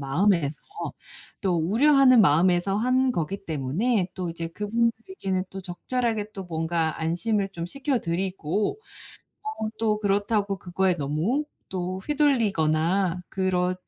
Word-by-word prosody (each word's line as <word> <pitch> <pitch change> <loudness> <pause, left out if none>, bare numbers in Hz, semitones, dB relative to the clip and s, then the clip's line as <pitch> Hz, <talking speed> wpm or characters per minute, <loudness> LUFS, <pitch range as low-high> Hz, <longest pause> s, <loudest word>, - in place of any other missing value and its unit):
마음에서 155 +1 +1 0.8
또 180 -3 +2
우려하는 255 - +5
마음에서 175 +4 +3
한 255 +2 +2
거기 195 +3 -3
때문에 175 - 0
또 180 -3 -3
이제 165 0 -4
그분들께는 215 - -1
또 195 - -6
적절하게 215 +3 -2
또 195 -1 -6
뭔가 160 -1 -1
안심을 195 +5 0
좀 170 -1 -4
시켜 275 +4 -1
드리고 185 - -1 0.6
어 430 - -3
또 215 -2 +1
'그렇다고 205 0 +1
그거에 185 +1 +1
너무 160 - 0 0.2
또 185 0 -3
휘둘리거나 190 - +2
그렇 185 -1 0
190 Hz, 270 characters per minute, -26 LUFS, 170-225 Hz, 0.8 s, 우려하는